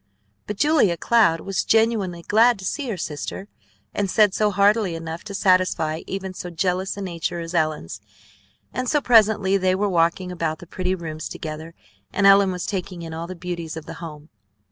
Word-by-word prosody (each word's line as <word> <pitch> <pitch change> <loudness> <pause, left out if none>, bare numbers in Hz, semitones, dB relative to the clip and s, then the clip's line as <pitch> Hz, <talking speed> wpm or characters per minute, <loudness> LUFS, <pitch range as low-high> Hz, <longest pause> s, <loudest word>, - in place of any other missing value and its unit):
But 210 - -4
Julia 290 - +3
Cloud 210 -9 +3
was 195 -1 -2
genuinely 215 -6 +1
glad 225 +4 +4
to 190 - -9
see 275 +5 -2
her 210 - -3
sister, 155 +5 -5 0.5
and 200 -2 -1
said 210 0 +4
so 210 +1 +2
heartily 200 -1 +2
enough 165 0 -6
to 200 -2 -6
satisfy 185 -5 +2
even 190 -1 -4
so 180 - -6
jealous 180 +3 -1
a - - -5
nature 175 -1 -3
as 165 +1 -6
Ellen's; 155 - -1 0.7
and 255 -1 -2
so 295 - +3
presently 215 -6 +4
they 185 -1 +2
were 205 +2 0
walking 175 +1 +1
about 165 -3 -2
the 175 - -12
pretty 185 +2 -2
rooms 160 -3 -6
together, 160 +1 -7 0.4
and 200 - +1
Ellen 195 -1 +6
was 180 -1 -4
taking 185 -3 -4
in 165 -1 -7
all 165 +1 -5
the 185 - -7
beauties 170 -2 -5
of 160 - -8
the - - -7
home. 155 -2 -9
185 Hz, 190 wpm, -23 LUFS, 165-200 Hz, 0.7 s, Ellen